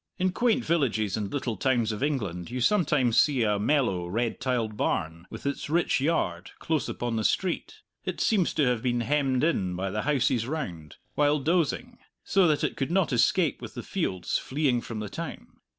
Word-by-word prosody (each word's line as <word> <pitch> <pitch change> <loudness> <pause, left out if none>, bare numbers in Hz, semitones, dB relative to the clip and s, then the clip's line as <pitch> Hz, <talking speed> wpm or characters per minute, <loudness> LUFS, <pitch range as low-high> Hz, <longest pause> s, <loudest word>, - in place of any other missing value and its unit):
In 185 0 +1
quaint 240 +4 +1
villages 110 - +1
and 105 -2 -3
little 130 -5 -2
towns 120 -4 +1
of 105 - -5
England 100 - -2
you 125 - -4
sometimes 140 - +3
see 135 -5 +2
a 105 -2 +1
mellow 105 -8 +1
red 115 +5 -1
tiled 120 -4 -1
barn, 85 -3 -2
with - - -9
its 140 +1 -3
rich 170 -4 +2
yard, 95 - 0
close 155 -4 -1
upon 120 -2 -2
the 110 - -1
street; 190 - -1 0.2
it - - -4
seems 200 -6 +2
to 150 - +3
have 125 -3 +1
been 120 -1 0
hemmed 135 0 +1
in 95 - +1
by 95 +1 -2
the 105 - -1
houses 130 -4 +1
round, 85 - -5 0.2
while 145 0 +3
dozing, 175 - 0 0.2
so 195 -2 +3
that 150 -2 +1
it - - 0
could 135 - -1
not 175 -5 +1
escape 150 +7 +2
with - - -8
the - - -5
fields 95 - -1
fleeing 130 -3 0
from 110 -2 -6
the 105 - -4
town. - - -8
130 Hz, 190 wpm, -27 LUFS, 110-155 Hz, 0.2 s, sometimes